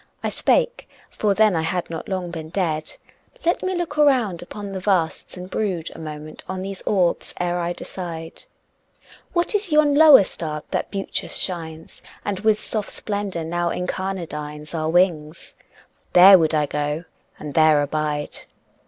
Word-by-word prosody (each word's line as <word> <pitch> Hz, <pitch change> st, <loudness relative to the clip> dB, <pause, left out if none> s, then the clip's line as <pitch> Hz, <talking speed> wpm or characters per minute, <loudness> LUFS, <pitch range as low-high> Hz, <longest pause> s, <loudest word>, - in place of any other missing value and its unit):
I -, -, 0 dB
spake -, -, +1 dB, 0.2 s
for 205 Hz, -2 st, 0 dB
then 215 Hz, -3 st, +4 dB
I 160 Hz, -, +1 dB
had 170 Hz, +1 st, -2 dB
not 165 Hz, -, -6 dB
long 185 Hz, -2 st, -3 dB
been 160 Hz, -2 st, -7 dB
dead 160 Hz, -4 st, -2 dB, 0.5 s
"Let 345 Hz, -, +2 dB
me 370 Hz, 0 st, -1 dB
look 340 Hz, -4 st, -3 dB
round 250 Hz, -, +3 dB
upon 200 Hz, +3 st, -7 dB
the 190 Hz, -, -4 dB
vasts, 185 Hz, -3 st, -1 dB
and 180 Hz, 0 st, -7 dB
brood 185 Hz, -5 st, -2 dB
A -, -, -11 dB
moment 155 Hz, -1 st, -8 dB
on 190 Hz, 0 st, -3 dB
these 195 Hz, 0 st, -6 dB
orbs 180 Hz, -4 st, +1 dB
ere 175 Hz, 0 st, 0 dB
I 175 Hz, 0 st, -1 dB
decide... 165 Hz, -3 st, -7 dB, 0.9 s
What 345 Hz, +2 st, +1 dB
is 410 Hz, -4 st, -1 dB
yon 300 Hz, -1 st, +4 dB
lower 295 Hz, -6 st, +8 dB
star 155 Hz, -4 st, -5 dB
that -, -, -2 dB
beauteous 195 Hz, -1 st, -3 dB
shines 165 Hz, -3 st, -4 dB, 0.2 s
And 200 Hz, -2 st, -2 dB
with 215 Hz, +1 st, +2 dB
soft 215 Hz, -2 st, -3 dB
splendor 200 Hz, -5 st, -3 dB
now 175 Hz, +1 st, -1 dB
incarnadines 165 Hz, -5 st, -4 dB
Our 160 Hz, -1 st, -1 dB
wings? 165 Hz, -3 st, 0 dB, 0.6 s
There 185 Hz, +1 st, +9 dB
would 160 Hz, -1 st, +2 dB
I 150 Hz, -1 st, +2 dB
go 150 Hz, +2 st, -2 dB, 0.3 s
and 150 Hz, -2 st, -7 dB
there 155 Hz, -1 st, +5 dB
abide." 150 Hz, 0 st, -2 dB
180 Hz, 160 wpm, -22 LUFS, 160-205 Hz, 0.9 s, There